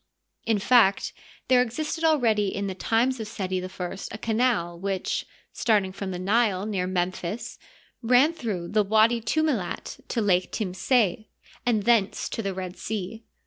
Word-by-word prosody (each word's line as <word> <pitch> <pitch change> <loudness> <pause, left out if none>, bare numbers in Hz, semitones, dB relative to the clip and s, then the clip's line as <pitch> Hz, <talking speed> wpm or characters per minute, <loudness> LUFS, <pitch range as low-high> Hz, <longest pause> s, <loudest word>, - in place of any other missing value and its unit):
In 225 -2 +3
fact, 205 -2 +3 0.3
there 255 -1 +5
existed 300 +7 -3
already 235 -10 +3
in 200 +1 -2
the 195 - -3
times 230 +6 +1
of 220 - -4
Seti 185 -4 -3
I 185 - -5 0.4
a - - -5
canal 220 -7 0
which, 195 0 -2 0.3
starting 205 -5 +1
from 195 0 -5
the 180 - -4
Nile, 200 0 +1
near 195 -4 -1
Memphis, 185 +4 -3 0.4
ran 250 +7 +4
through 210 - -4
the 210 0 +3
Watdi 220 +3 +3
Tumilit 265 - -1
to - - -2
Lake 185 -4 +2
Timseh, 215 +1 0 0.4
and 220 -4 +2
thence 225 -3 +2
to - - -3
the 195 -3 -3
Red 185 -1 -6
Sea. 220 +1 -5
215 Hz, 150 wpm, -26 LUFS, 190-235 Hz, 0.4 s, there